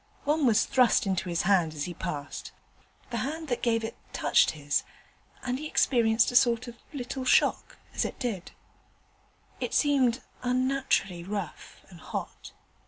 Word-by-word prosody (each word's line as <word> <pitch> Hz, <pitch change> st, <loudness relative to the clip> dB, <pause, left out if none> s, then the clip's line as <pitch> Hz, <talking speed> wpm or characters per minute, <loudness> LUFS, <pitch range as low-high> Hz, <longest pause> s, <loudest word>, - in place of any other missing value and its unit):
One 295 Hz, -1 st, +2 dB
was 220 Hz, -3 st, +4 dB
thrust 250 Hz, -2 st, +3 dB
into 190 Hz, -1 st, -1 dB
his 170 Hz, -1 st, 0 dB
hand 175 Hz, -4 st, +2 dB
as 145 Hz, -, -3 dB
he 180 Hz, -, -5 dB
passed: 145 Hz, -3 st, -5 dB, 0.6 s
the 235 Hz, -, -2 dB
hand 305 Hz, +7 st, -3 dB
that 245 Hz, -, -1 dB
gave 230 Hz, -1 st, +1 dB
it 225 Hz, -, -4 dB, 0.2 s
touched -, -, +4 dB
his, 145 Hz, 0 st, 0 dB, 0.6 s
and 255 Hz, 0 st, -2 dB
he 305 Hz, -, -4 dB
experienced 230 Hz, -5 st, +3 dB
a -, -, -6 dB
sort 240 Hz, -1 st, +4 dB
of 235 Hz, -, -8 dB, 0.2 s
little 265 Hz, -1 st, -4 dB
shock 255 Hz, -, +2 dB, 0.2 s
as -, -, 0 dB
it -, -, -4 dB
did 225 Hz, -9 st, -3 dB
so. -, -, -23 dB, 1.1 s
It -, -, -2 dB
seemed 265 Hz, -4 st, +3 dB, 0.2 s
unnaturally 255 Hz, -8 st, 0 dB
rough 195 Hz, -2 st, -6 dB
and 175 Hz, -3 st, -13 dB
hot. -, -, -6 dB
235 Hz, 160 wpm, -28 LUFS, 190-260 Hz, 1.1 s, was